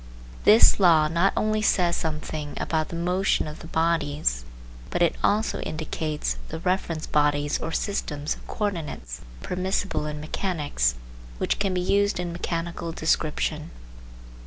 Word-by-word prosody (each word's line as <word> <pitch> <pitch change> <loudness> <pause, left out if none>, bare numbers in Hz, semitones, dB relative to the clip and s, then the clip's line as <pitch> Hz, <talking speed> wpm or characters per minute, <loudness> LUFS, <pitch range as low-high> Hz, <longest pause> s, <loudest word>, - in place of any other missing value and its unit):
This 220 0 +7
law 165 -5 +6
not 170 +5 +2
only 215 0 +1
says 180 -5 +3
something 150 -1 -4
about 155 -1 -1
the - - -5
motion 180 +1 +1
of 150 - -8
the - - -9
bodies, 150 - 0 0.5
but 175 - +1
it 170 - +2
also 215 +2 +2
indicates 155 - -3
the - - -4
reference 170 -2 -1
bodies 145 0 +1
or 160 - -4
systems 155 -6 -2
of - - -14
coordinates, 155 - -4 0.2
permissible 185 -3 -1
in 150 0 -4
mechanics, 150 - -1 0.4
which - - 0
can 195 -2 0
be 180 - +1
used 200 +1 +2
in 175 -1 -3
mechanical 170 0 -3
description. - - 0
165 Hz, 135 wpm, -25 LUFS, 150-185 Hz, 0.5 s, This